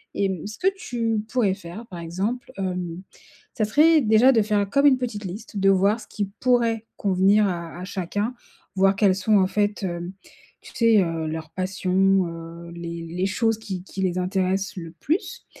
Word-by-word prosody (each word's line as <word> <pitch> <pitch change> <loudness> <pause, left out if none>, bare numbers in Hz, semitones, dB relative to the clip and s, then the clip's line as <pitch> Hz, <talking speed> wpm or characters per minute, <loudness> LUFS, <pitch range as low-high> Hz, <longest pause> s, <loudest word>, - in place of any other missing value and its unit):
Et 195 -1 +1
mmh, 190 +1 -4
ce 215 - -8
que 375 - +1
tu 230 - -1
pourrais 225 -7 +2
faire, 195 +4 -9
par 175 -2 -8
exemple, 195 +9 -3
hem, 180 -2 -3 0.5
ça 215 - 0
serait 310 +8 +5
déjà 225 +3 +5
de 225 -3 +4
faire 205 -2 0
comme 280 +4 +3
une 260 -2 +5
petite 220 -5 -4
liste. 205 +3 -7
De 195 0 +3
voir 200 +4 +3
ce 210 - -12
qui 205 - -3
pourrait 235 -3 +2
convenir 200 +2 +3
à, 170 -2 -4
à - - -6
chacun, 205 +6 -3 0.4
voir 195 +1 +4
quelles 195 -2 +3
sont 205 +2 +3
en 185 -1 +4
fait 205 +1 -1
heu, 175 -1 -3 0.5
tu - - -13
sais, 230 -3 +5
heu, 165 -2 -3
leurs 160 0 -5
passions, 190 0 +1
heu, 165 +1 -9
les 170 0 -6
les 180 +3 -1
choses 225 +2 +1
qui 190 -5 -6
qui 190 0 -7
les 185 -1 0
intéressent 190 +1 -1
le 165 -2 -7
plus. 330 +8 -2
195 Hz, 190 wpm, -24 LUFS, 180-220 Hz, 0.5 s, serait